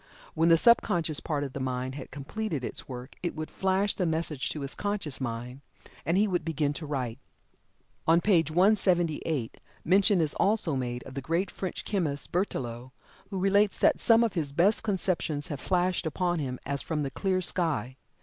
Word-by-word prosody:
When 165 +1 +3
the 165 - +7
subconscious 170 -7 +3
part 145 -3 -2
of 135 -2 -5
the - - -4
mind 130 0 -2
had 135 -1 -8
completed 155 +1 -4
its - - -6
work, 125 +1 -7
it 175 - -3
would 155 0 -5
flash 190 +1 +1
the 180 - -1
message 160 -4 0
to 150 - -4
his 140 0 -3
conscious 205 -10 -3
mind, 125 +2 -5 0.5
and 170 +3 +2
he 210 +2 +4
would 180 -3 0
begin 150 -2 0
to 155 +1 -6
write. 130 -4 -3 0.9
On 165 +1 +6
page 170 -5 +3
178 175 - +1 0.3
mention 195 +3 +4
is 155 -3 +1
also 200 -7 +1
made 125 -2 -3
of 135 - -10
the 135 - -4
great 165 +8 -1
French 185 -3 -5
chemist 160 -9 -1
Berthelot, 130 - -2 0.4
who 195 - -4
relates 200 +2 +3
that - - +3
some 230 0 +5
of 230 - 0
his 155 -6 -1
best 180 +9 +3
conceptions 180 -7 -1
have 145 -3 -4
flashed 180 -2 0
upon 175 +2 0
him 130 -3 -3
as 140 0 -1
from 155 -2 -2
the 135 - -3
clear 190 +2 0
sky. 160 - 0
160 Hz, 185 wpm, -28 LUFS, 140-185 Hz, 0.9 s, the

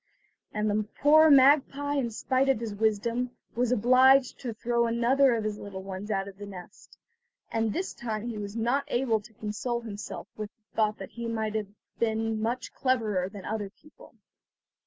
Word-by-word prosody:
And 210 0 -1
the 210 0 0
poor 310 +2 +7
magpie, 285 +1 +5
in 270 -5 0
spite 260 +4 0
of 265 - +3
his 225 -3 -4
wisdom, 225 +4 0 0.2
was 245 0 0
obliged 255 +3 +5
to 245 - -4
throw 235 +1 0
another 245 +3 +3
of 225 - -2
his 210 -1 -3
little 195 -2 -7
ones 195 +2 -6
out 195 -2 -1
of 195 0 -11
the 205 - -7
nest; 185 -3 -12 0.5
and 225 -1 0
this 370 - -3
time 220 -1 -4
he 225 -3 -4
was 205 0 -6
not 240 +5 +1
able 240 -5 +1
to 220 - -16
console 225 +4 -3
himself 210 -3 -7
with 215 -1 -5
the 220 -1 -44
thought 215 -1 +1
that 195 - -9
he 235 -1 -5
had 215 -2 -3 0.2
been 225 -1 0
much 240 +3 -2
cleverer 215 -8 0
than 200 -2 -10
other 210 -2 -3
people. 305 +9 -19
225 Hz, 180 wpm, -28 LUFS, 210-250 Hz, 0.5 s, poor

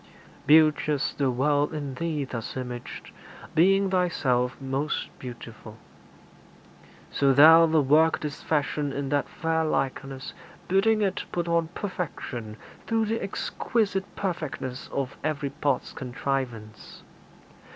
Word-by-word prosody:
Beauteous 150 -2 +4
The 140 -2 0
world 145 +4 +1
in 145 -3 -4
Thee 155 0 -2
thus 125 -2 -6
imaged, 125 -1 -7 0.4
being 195 +3 +4
Thyself 135 -9 +1
Most 135 +2 -2
beautiful. 115 -3 -9 1.3
So 140 -1 +3
Thou 160 +4 +8
the 160 -2 +3
work 155 +4 +4
didst 150 -2 -6
fashion 145 -1 0
In 140 0 -3
that 145 0 0
fair 160 -1 -1
likeness, 135 -3 -2 0.3
bidding 215 +3 +3
it 195 -2 -1
put 175 -1 -2
on 170 -1 +1
Perfection 130 - -5 0.3
through 225 -1 +1
the 225 +2 -2
exquisite 195 -1 -2
perfectness 155 -8 -4
Of 135 -2 -3
every 145 -3 -2
part's 140 -3 -1
contrivance. 125 -4 -5
145 Hz, 115 wpm, -26 LUFS, 130-165 Hz, 1.3 s, Thou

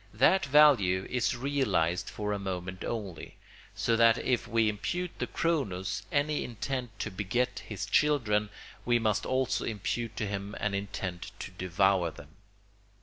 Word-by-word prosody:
That 140 - +4
value 130 -11 +5
is 125 -1 +1
realised 130 -11 0
for 105 -1 -3
a 100 - -2
moment 95 -1 -4
only; 100 -8 -5 0.4
so 115 - +1
that 115 0 +5
if 120 -2 0
we 115 -1 +2
impute 175 - -3
to - - -1
Cronos 105 - -1
any 145 +1 +1
intent 120 -1 -4
to 105 - -3
beget 120 +7 -1
his 100 -3 -4
children 105 -4 +2 0.3
we 120 0 +3
must 110 -3 0
also 130 0 0
impute 115 +1 -3
to 110 - -1
him 100 0 -4
an 105 -1 -1
intent 100 -3 -4
to - - -7
devour 90 0 +2
them. 75 -2 -13
105 Hz, 145 wpm, -30 LUFS, 95-125 Hz, 0.4 s, value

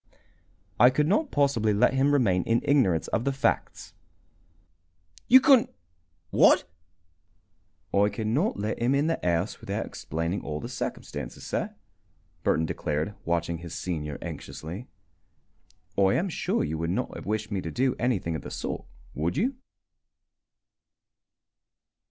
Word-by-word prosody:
"I 120 +2 +8
could 150 +3 +1
not 275 - +2
possibly 120 -8 +2
let 125 +5 +4
him 135 +2 +3
remain 105 -11 +3
in 115 +1 +1
ignorance 115 - +3
of 115 - 0
the 140 - +1
facts." 135 - -1 1.3
"You 260 - +9
couldn't 265 -4 +5 0.6
what?" - - +6 1.3
"I 100 +1 +4
could 105 +2 -4
not 140 - +1
let 105 +2 -2
him 120 +3 +3
the 165 0 0
house 85 +3 0
without - - -3
explaining 85 +5 -3
all 75 -1 -4
the - - -6
circumstances, - - -5
sir," - - -3 0.7
Burton 80 - +2
declared, 75 +5 -2
watching 85 0 -1
his 85 0 -8
senior 75 -5 -3
anxiously. 90 - -7 1.1
"I 95 -1 +3
am 190 +3 0
sure - - -1
you 80 +1 -3
would 85 0 -1
not 90 - -2
have - - -8
wished 110 +1 -2
me 100 -2 -1
to 80 - -5
do 130 +7 +1
anything 100 -10 0
of 80 - -4
the - - -8
sort, - - -4 0.3
would 80 - -2
you?" 245 - +1
105 Hz, 140 wpm, -27 LUFS, 85-135 Hz, 1.3 s, You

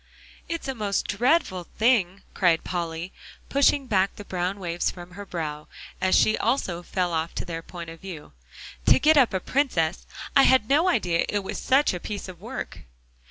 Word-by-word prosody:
"It's 335 -3 -4
a 265 - -1
most 210 -5 -1
dreadful 230 - +1
thing," 205 -5 +2
cried 175 -4 +2
Polly, 170 0 -4 0.4
pushing 280 0 +3
back 195 -5 +1
the 205 - -10
brown 185 +2 -2
waves 175 -2 -1
from 175 0 -10
her 200 +2 -9
brow, 150 -4 -5 0.3
as 185 0 +3
she 215 - +4
also 205 -8 -1
fell 180 -1 -2
off 160 +1 -2
to - - -3
their 165 -2 -5
point 170 -1 -9
of 165 - -12
view, 170 - -9 0.5
"to - - +7
get 310 +4 +4
up 270 -5 +5
a 190 - 0
princess. 180 - 0 0.3
I 275 - +8
had 260 -5 +5
no 310 +8 +3
idea 175 - +1
it 205 -1 -1
was - - -5
such 270 -1 +3
a 180 - -4
piece 205 +2 -6
of 185 -2 -11
work." - - -6
190 Hz, 185 wpm, -25 LUFS, 175-245 Hz, 0.5 s, I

